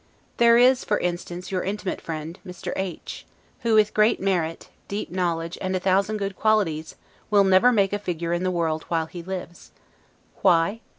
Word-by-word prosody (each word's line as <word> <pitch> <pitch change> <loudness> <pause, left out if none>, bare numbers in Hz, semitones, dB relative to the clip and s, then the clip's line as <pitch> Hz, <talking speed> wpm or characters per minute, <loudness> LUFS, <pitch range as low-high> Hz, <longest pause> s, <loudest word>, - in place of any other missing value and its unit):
There 235 0 +6
is, 250 +1 +5
for 210 - +1
instance, 175 +1 -4
your 185 -1 0
intimate 200 -1 -3
friend, 160 +2 -6
Mr. 180 -2 -6
H, 190 -3 -5 0.4
who 230 -2 +1
with 210 -1 +4
great 215 +2 +3
merit, 175 -4 -1 0.2
deep 200 -2 -4
knowledge, 170 -2 -2
and 185 0 -1
a - - 0
thousand 195 +3 +1
good 200 -1 -3
qualities, 180 -9 0 0.3
will 205 -2 +5
never 190 +6 +5
make 200 -4 +2
a 205 - 0
figure 170 -3 -3
in 175 - -1
the 185 - 0
world 165 -3 -1
while 165 -1 0
he 175 +2 -9
lives. 180 -1 -7 0.7
Why? 170 +6 +3
185 Hz, 175 wpm, -24 LUFS, 170-205 Hz, 0.7 s, There